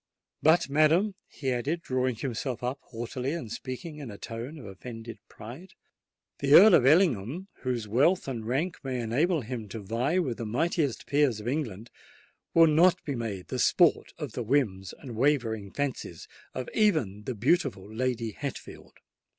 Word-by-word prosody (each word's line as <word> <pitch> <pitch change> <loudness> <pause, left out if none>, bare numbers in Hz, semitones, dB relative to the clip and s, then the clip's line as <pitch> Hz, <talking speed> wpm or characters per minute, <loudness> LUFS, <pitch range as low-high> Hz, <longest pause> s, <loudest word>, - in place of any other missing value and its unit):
But, 160 +3 +4
madam," 155 +8 +3
he 135 -3 -3
added, 145 +8 -2
drawing 130 -1 0
himself 125 +1 -4
up 130 +3 -2
haughtily, 125 +4 -4
and 125 -11 -5
speaking 130 +6 -6
in 140 -5 -7
a 100 - -8
tone 120 +9 -7
of 135 - -10
offended 115 +3 -9
pride, 140 - -11 0.7
"the 140 +1 +5
Earl 210 +1 +9
of 130 -6 +6
Ellingham, 160 - +2
whose 120 -4 -2
wealth 140 - +2
and 120 -4 -4
rank 145 +11 -2
may 130 -2 -2
enable 145 +9 +1
him 115 -3 -6
to 110 - -6
vie 115 - -1
with 135 -10 0
the 115 - -3
mightiest 140 +1 0
peers 140 -6 +2
of 105 - -7
England, 120 -6 -3 0.6
will 165 0 +8
not 170 +4 +4
be 145 - -3
made 110 -7 -5
the - - -3
sport - - +3
of - - -5
the - - -4
whims 110 -7 0
and 125 -5 -9
wavering 115 -6 +1
fancies 130 - -4 0.3
of 130 - -4
even 130 - +1
the 130 - -3
beautiful 120 - +1
Lady 115 0 -2
Hatfield." 140 +5 -8
130 Hz, 165 wpm, -28 LUFS, 115-150 Hz, 0.7 s, Earl